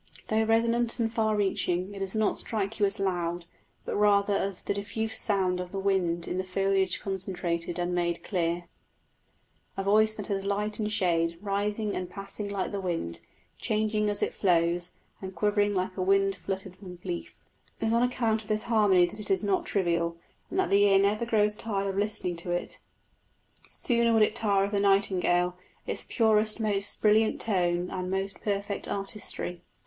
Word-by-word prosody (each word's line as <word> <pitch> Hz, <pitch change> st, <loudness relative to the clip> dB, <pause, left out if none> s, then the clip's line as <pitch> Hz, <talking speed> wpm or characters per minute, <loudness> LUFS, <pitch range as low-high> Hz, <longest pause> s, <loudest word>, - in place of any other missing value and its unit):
Though 220 Hz, 0 st, +2 dB
resonant 230 Hz, +1 st, +2 dB
and 225 Hz, -1 st, 0 dB
far 220 Hz, -2 st, +1 dB
reaching 190 Hz, -2 st, 0 dB
it 200 Hz, -, -7 dB
does 195 Hz, +1 st, -3 dB
not 215 Hz, -1 st, +2 dB
strike 215 Hz, -1 st, -2 dB
you 205 Hz, -, +4 dB
as 195 Hz, -, -2 dB
loud, 175 Hz, -3 st, -1 dB, 0.4 s
but -, -, -3 dB
rather 205 Hz, 0 st, +3 dB
as 195 Hz, -1 st, -2 dB
the -, -, -1 dB
diffused 220 Hz, +2 st, -1 dB
sound 190 Hz, -3 st, +1 dB
of 180 Hz, 0 st, -5 dB
the 195 Hz, -, -5 dB
wind 185 Hz, -4 st, 0 dB
in 180 Hz, -, -2 dB
the -, -, -1 dB
foliage 190 Hz, 0 st, +1 dB
concentrated 175 Hz, -3 st, -3 dB
and 175 Hz, 0 st, -1 dB
made 175 Hz, -1 st, -1 dB
clear 175 Hz, -2 st, -1 dB, 1.1 s
a 195 Hz, -, -1 dB
voice 215 Hz, +2 st, +3 dB
that 205 Hz, -, -4 dB
has 195 Hz, -1 st, -2 dB
light 210 Hz, +2 st, -1 dB
and 215 Hz, -1 st, -1 dB
shade, 170 Hz, -5 st, +1 dB
rising 205 Hz, +1 st, -2 dB
and 180 Hz, -1 st, -4 dB
passing 200 Hz, +1 st, -5 dB
like 200 Hz, -2 st, -2 dB
the 200 Hz, -1 st, -3 dB
wind, 165 Hz, -, -2 dB, 0.4 s
changing 215 Hz, -1 st, 0 dB
as 205 Hz, 0 st, +1 dB
it -, -, -1 dB
flows, 175 Hz, -1 st, +1 dB, 0.3 s
and 190 Hz, -1 st, -7 dB
quivering 205 Hz, +2 st, +1 dB
like 185 Hz, 0 st, -1 dB
a -, -, -1 dB
wind 195 Hz, +1 st, +3 dB
fluttered 190 Hz, -1 st, -5 dB, 0.3 s
leaf. 175 Hz, -2 st, -5 dB, 0.4 s
It -, -, -2 dB
is 225 Hz, -, +1 dB
on 235 Hz, -, +3 dB
account 230 Hz, -3 st, +1 dB
of 210 Hz, -, -14 dB
this 215 Hz, 0 st, -1 dB
harmony 205 Hz, -6 st, +4 dB
that 195 Hz, +5 st, -8 dB
it 210 Hz, -, -1 dB
is 190 Hz, 0 st, +2 dB
not 200 Hz, -2 st, 0 dB
trivial, 170 Hz, -3 st, 0 dB, 0.3 s
and -, -, -4 dB
that 380 Hz, -, +1 dB
the 200 Hz, -, +5 dB
ear 200 Hz, -1 st, +5 dB
never 205 Hz, +4 st, +1 dB
grows 210 Hz, -2 st, +2 dB
tired 200 Hz, -3 st, -2 dB
of 195 Hz, -, -3 dB
listening 200 Hz, -4 st, -1 dB
to 170 Hz, +1 st, -4 dB
it: 175 Hz, 0 st, -3 dB, 0.9 s
sooner 235 Hz, -2 st, +1 dB
would 220 Hz, -1 st, +5 dB
it 215 Hz, -, +1 dB
tire 200 Hz, -4 st, +2 dB
of 200 Hz, -, -2 dB
the 205 Hz, -, +1 dB
nightingale 180 Hz, -3 st, +2 dB, 0.3 s
its -, -, -5 dB
purest, 220 Hz, -1 st, +2 dB
most 205 Hz, -2 st, 0 dB
brilliant 215 Hz, +1 st, +4 dB
tone 180 Hz, -4 st, +1 dB
and 185 Hz, -1 st, -3 dB
most 195 Hz, +1 st, -3 dB
perfect 200 Hz, -1 st, -2 dB
artistry. 195 Hz, -3 st, -2 dB
195 Hz, 185 wpm, -28 LUFS, 180-210 Hz, 1.1 s, the